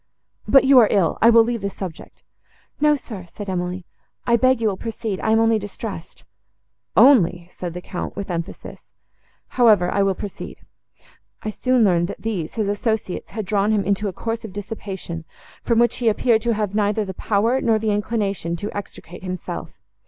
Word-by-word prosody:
But 270 - +6
you 265 -1 +7
are 225 - +6
ill; 190 -5 +1
I 230 - +7
will 230 -1 +7
leave 230 -1 -2
the 200 - -2
subject."—"No, 200 - -4
sir," 205 -10 -9
said 205 +4 -8
Emily, 180 -1 -3 0.4
"I 235 - +4
beg 255 +1 +3
you 225 - +1
will 195 - -2
proceed: 220 -2 -4
I - - -1
am 220 0 +4
only 225 -1 +3
distressed."—"Only!" 195 0 0
said 175 -2 -6
the 180 - -5
Count, 180 - -5
with 200 -1 -5
emphasis; 170 +2 -6 0.6
"however, 215 -8 +4
I 200 - +1
will 195 -1 +2
proceed. 200 0 -7 0.9
I 215 - -2
soon 255 +2 +2
learned, 175 -4 +3
that - - -8
these, 195 -8 -3
his 215 -3 -1
associates, 205 -1 -2
had 215 0 -5
drawn 205 +2 +1
him 210 -2 +2
into 200 +2 0
a 190 - -4
course 225 +4 -4
of 215 -4 -8
dissipation, 195 -5 -6 0.4
from 235 - +1
which 240 +1 +3
he 240 -3 +2
appeared 220 +1 +2
to 235 0 0
have 210 -2 -2
neither 210 0 +1
the 190 - -6
power, 225 +7 +1
nor 225 -2 +3
the 215 0 -1
inclination, 205 -5 -1
to 205 +5 -6
extricate 195 -3 -8
himself. 185 -1 -5
205 Hz, 180 wpm, -22 LUFS, 190-225 Hz, 0.9 s, you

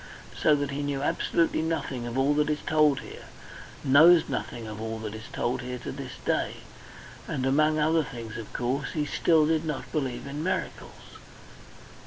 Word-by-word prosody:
So 150 - +4
that 145 -1 -2
he 140 +1 -3
knew 145 -1 -2
absolutely 165 +2 +1
nothing 145 -7 -2
of 120 +2 -4
all 135 +2 +3
that 150 +1 +1
is 150 0 -1
told 150 -3 +3
here - - -11 0.6
knows 160 +5 +7
nothing 115 -1 -4
of 110 0 -7
all 110 0 -3
that 110 -1 -6
is 110 +1 -8
told 125 +2 -1
here 125 0 -5
to 125 - -6
this 135 -2 -7
day. - - 0 0.7
And 130 - -2
among 155 +3 +3
other 160 +1 +3
things, 115 -5 -8
of 115 -2 -7
course, 130 +3 -2
he 150 -2 -1
still 160 +1 +3
did 160 0 +1
not 150 -3 -4
believe 130 -5 -2
in 140 +2 -5
miracles. 185 - -5
140 Hz, 180 wpm, -27 LUFS, 125-155 Hz, 0.7 s, knows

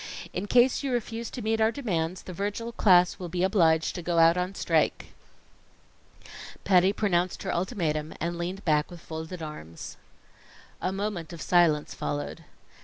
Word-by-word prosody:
In 185 +3 -3
case 245 +3 +4
you 275 -2 -2
refuse 235 -1 -3
to 250 - -7
meet 220 +1 0
our 220 +1 +4
demands, 185 -9 -2
the 185 - -8
Virgil 205 +5 -3
class 180 -5 +4
will 180 -2 -5
be 175 +1 -1
obliged 165 -5 +3
to 175 - -5
go 170 0 -1
out 165 0 +6
on 180 +2 -2
strike." - - 0 1.5
Patty 185 0 +4
pronounced 185 -4 0
her 190 - -2
ultimatum, 165 -6 -1
and 170 +1 -2
leaned 180 +3 -5
back 150 -2 +2
with 175 - -10
folded 160 +1 -7
arms. 85 - -8 0.8
A 185 - 0
moment 195 -5 -4
of 170 - -8
silence 165 -4 +3
followed. 145 +3 -4
180 Hz, 160 wpm, -27 LUFS, 165-205 Hz, 1.5 s, out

